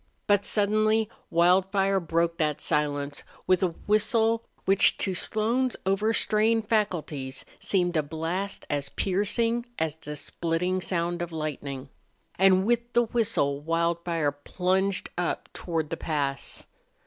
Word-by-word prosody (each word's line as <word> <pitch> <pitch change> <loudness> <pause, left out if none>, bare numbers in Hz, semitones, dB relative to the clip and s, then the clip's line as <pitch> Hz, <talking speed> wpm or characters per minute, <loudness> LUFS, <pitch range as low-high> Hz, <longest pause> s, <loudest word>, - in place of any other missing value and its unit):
But 205 -1 +3
suddenly 215 +1 +2 0.2
Wildfire 190 +3 +3
broke 170 0 0
that 150 -2 0
silence 145 -1 -1 0.2
with 185 -1 +3
a 175 -3 0
whistle 225 +2 +2 0.2
which 195 0 +5
to 190 - -1
Slone's 230 +7 +1
overstrained 215 +2 +2
faculties 160 -11 -1
seemed 180 -3 0
a 155 - +4
blast 165 +6 -3
as 145 -1 -2
piercing 230 +5 0
as 160 -2 -1
the 150 -2 -7
splitting 175 +5 -1
sound 175 -1 -1
of 175 0 -4
lightning. 145 -4 -5 0.4
And 190 0 +4
with 235 +1 0
the 240 - +4
whistle 220 - 0
Wildfire 165 -1 0
plunged 185 +6 -1
up 175 - -2
toward 160 -3 -3
the 165 - -2
pass. 140 -3 -3
180 Hz, 125 wpm, -27 LUFS, 160-210 Hz, 0.4 s, which